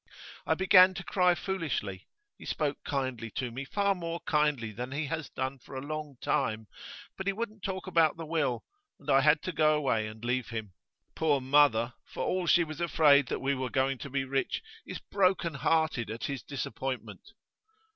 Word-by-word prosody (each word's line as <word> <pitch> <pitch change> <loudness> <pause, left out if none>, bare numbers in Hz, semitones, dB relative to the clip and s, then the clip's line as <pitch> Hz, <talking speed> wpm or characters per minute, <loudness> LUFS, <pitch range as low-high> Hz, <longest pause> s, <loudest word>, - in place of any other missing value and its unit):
I - - +3
began 185 0 +6
to 175 - -5
cry 180 -2 +3
foolishly. 160 - -3 0.3
He - - -13
spoke 145 -2 -2
kindly 130 -5 -2
to 125 -2 -2
me, 130 +4 -5
far 200 +6 +1
more 170 -2 -4
kindly 150 -7 +1
than 125 +5 -6
he 145 +2 -2
has 160 0 -4
done 130 +1 -4
for 135 - -12
a - - -2
long 155 -1 -5
time; 110 0 0 0.5
but 190 - -6
he 200 - +2
wouldn't 215 0 -5
talk 190 0 -4
about 165 -4 +3
the 165 - -6
will, 150 -7 -1 0.4
and 145 0 -3
I 135 0 +6
had 150 +2 +4
to 185 - -2
go 155 -1 +3
away 125 -7 0
and 110 +2 -9
leave 125 0 -1
him. 110 -5 -5 0.4
Poor 150 -3 +2
mother! 130 -3 +3
for - - -6
all 180 -1 -1
she 170 - +5
was 155 +1 -7
afraid 150 -5 +5
that - - -3
we 140 +1 +1
were 130 -1 -2
going 135 0 0
to 140 - -7
be 135 0 -1
rich, 135 - -1 0.2
is - - -5
broken 185 -4 +1
hearted 155 -3 +1
at 115 +1 -6
his 140 -2 -3
disappointment. 135 -1 -5
145 Hz, 190 wpm, -30 LUFS, 130-165 Hz, 0.5 s, began